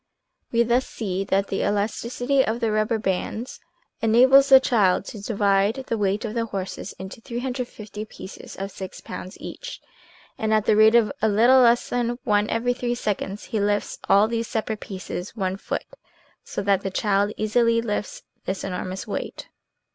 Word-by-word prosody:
We 235 0 +4
thus 240 +2 +1
see 195 -3 -3
that 195 +1 +1
the 195 - -1
elasticity 235 +6 0
of 225 0 -2
the 225 -2 0
rubber 215 +2 +1
bands 215 +4 -3 0.4
enables 260 +5 +6
the 265 -1 +10
child 210 -8 +2
to 210 - -8
divide 200 -1 +2
the 230 - +1
weight 200 +2 0
of 215 - -4
the 230 -1 -1
horses 190 -3 -5
into 190 +4 -9
350 240 -4 -5
pieces 200 -2 -10
of 195 +1 -5
six 190 0 -8
pounds 185 - -8
each, - - -8 0.6
and 220 0 +2
at 215 -1 +1
the - - +4
rate 220 +2 +6
of 220 -4 +4
a 220 - +3
little 235 +6 +5
less 240 -1 +4
than 240 0 -1
one 210 -4 +2
every 240 +2 +1
three 245 -1 -2
seconds, 205 -3 -3
he 220 - -3
lifts 205 0 0
all 200 +2 +6
these 230 0 -2
separate 220 -1 -2
pieces 185 0 -6
one 190 -3 -1
foot, 195 - -4 0.6
so - - -4
that 195 -1 +2
the 195 - -3
child 200 +1 +1
easily 230 +2 +2
lifts 210 -3 -3 0.2
this 190 0 -3
enormous 185 0 -4
weight. - - -5
215 Hz, 170 wpm, -24 LUFS, 200-235 Hz, 0.6 s, the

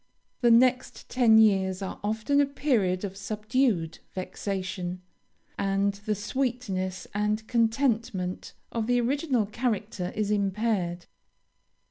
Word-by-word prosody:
The 240 - +4
next 250 +2 +3
ten 235 -3 +5
years 195 -3 +3
are 190 - -5
often 220 +7 +1
a 285 - +2
period 225 -11 0
of 195 -1 -6
subdued 210 -3 0 0.2
vexation, 185 -1 -4 0.6
and 200 0 +1
the 210 +2 -3
sweetness 205 -4 -2
and 210 +1 -1
contentment 225 -6 0 0.2
of 225 -1 -2
the 245 0 +3
original 260 -1 +1
character 215 -4 -2
is 210 -1 0
impaired. 195 -3 0
210 Hz, 110 wpm, -27 LUFS, 190-240 Hz, 0.6 s, ten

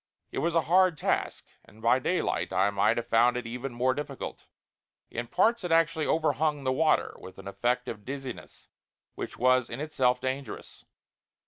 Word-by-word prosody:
It - - -3
was 170 +1 0
a 165 - +5
hard 180 +1 +3
task, - - -1 0.2
and 110 - -19
by 115 +3 +3
daylight 130 - -1
I 95 +2 +2
might 105 +3 +2
have 120 - -2
found 120 +1 +3
it 125 - -4
even 125 +3 -5
more 125 +2 +1
difficult. 145 +2 -6 0.6
In 120 0 -4
parts 230 - +2
it 175 - -3
actually 165 -1 +3
overhung 150 -2 +1
the 130 - +1
water, 155 +3 +2
with 95 - -11
an 95 - -10
effect 120 +5 -1
of 105 - -6
dizziness 135 -1 -8 0.5
which - - -6
was 130 0 +3
in 115 - -6
itself 130 -5 +1
dangerous. 130 +2 -5
130 Hz, 175 wpm, -28 LUFS, 120-155 Hz, 0.6 s, a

